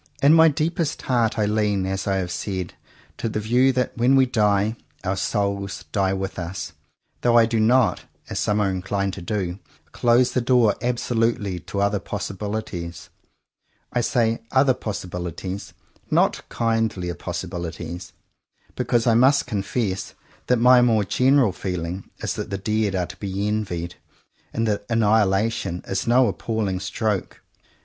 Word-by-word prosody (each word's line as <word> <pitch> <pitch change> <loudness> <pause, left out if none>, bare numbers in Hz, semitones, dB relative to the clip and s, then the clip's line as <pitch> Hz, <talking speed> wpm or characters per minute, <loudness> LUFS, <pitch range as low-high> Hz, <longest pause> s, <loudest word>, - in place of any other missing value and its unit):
In 145 +2 +7
my 165 0 +7
deepest 160 +1 -1
heart 120 -3 +1
I 105 - +2
lean, 105 -2 +1
as 95 +1 -3
I 95 - +1
have 90 -2 -2
said, 95 -3 -4 0.5
to 115 - -1
the 110 - -2
view 125 +5 +3
that, 125 0 -1
when 125 +3 +3
we 135 -1 +6
die, 105 -3 +2 0.3
our 95 0 0
"souls" 100 -1 -2
die 95 -2 +1
with 95 0 -3
us, 90 +2 -5 0.5
though 120 -1 +4
I 115 - +7
do 115 0 0
not, 120 +2 +3 0.2
as - - -3
some 105 0 +1
are 100 -2 +2
inclined 95 +1 -2
to 95 - -7
do, 95 0 -3 0.3
close 120 +1 +3
the 125 - 0
door 120 -4 +4
absolutely 115 -5 0
to 100 +3 -4
other 100 0 +1
possibilities. 100 -4 -5 0.8
I 120 - +2
say 115 -1 +1
"other" 130 0 +4
possibilities, 90 -2 -5 0.4
not - - +1
kindlier 110 -6 0
possibilities, 85 0 -6 0.6
because 120 -1 +1
I 115 - +4
must 130 +5 +4
confess 100 -3 -2 0.3
that 125 - +3
my 125 +1 +6
more 115 -3 +3
general 130 +1 +3
feeling 90 0 -4
is - - -3
that - - -5
the 100 - -2
dead 105 0 0
are 90 -1 0
to - - -11
be 100 0 -3
envied, 90 -5 -3 0.5
and 115 0 -1
that 105 -1 -1
annihilation 105 -4 +1
is 95 +2 -2
no 125 +1 +5
"appalling 105 -5 -2
stroke." 100 +1 -2
105 Hz, 150 wpm, -23 LUFS, 95-120 Hz, 0.8 s, In